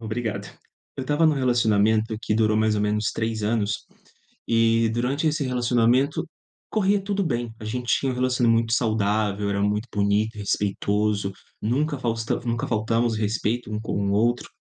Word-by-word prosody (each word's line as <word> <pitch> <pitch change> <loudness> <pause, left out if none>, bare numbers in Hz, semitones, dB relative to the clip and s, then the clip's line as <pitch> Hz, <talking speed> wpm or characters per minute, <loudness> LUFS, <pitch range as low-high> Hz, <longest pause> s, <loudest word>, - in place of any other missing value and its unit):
obrigado. 110 0 -3 0.5
Eu - - -3
estava 150 +4 +1
num 155 - +4
relacionamento 110 -4 +2
que 110 - -1
durou 110 -1 +2
mais 110 0 +2
ou 105 - 0
menos 105 +1 0
3 110 -1 -2
anos 105 -2 -1 0.6
e 115 0 +3
durante 125 +7 -1
esse 150 -1 -1
relacionamento, 125 +2 +1 0.4
corria 205 -1 +2
tudo 200 0 -1
bem. 120 -6 -2
A - - -8
gente 120 +3 0
tinha 135 - -1
um - - -2
relacionamento 125 -2 +2
muito 115 0 -1
saudável, 105 -2 0
era 100 0 0
muito 105 +2 0
bonito, 105 +2 +1
respeitoso, 105 0 0 0.3
nunca 145 +7 0
faltamos, 115 -3 -2
nunca 115 0 -1
faltamos 115 +1 0
respeito 110 +2 -1
um 105 - -2
com 110 - -5
o 100 -1 0
outro. 120 +4 +1
115 Hz, 160 wpm, -24 LUFS, 105-125 Hz, 0.6 s, num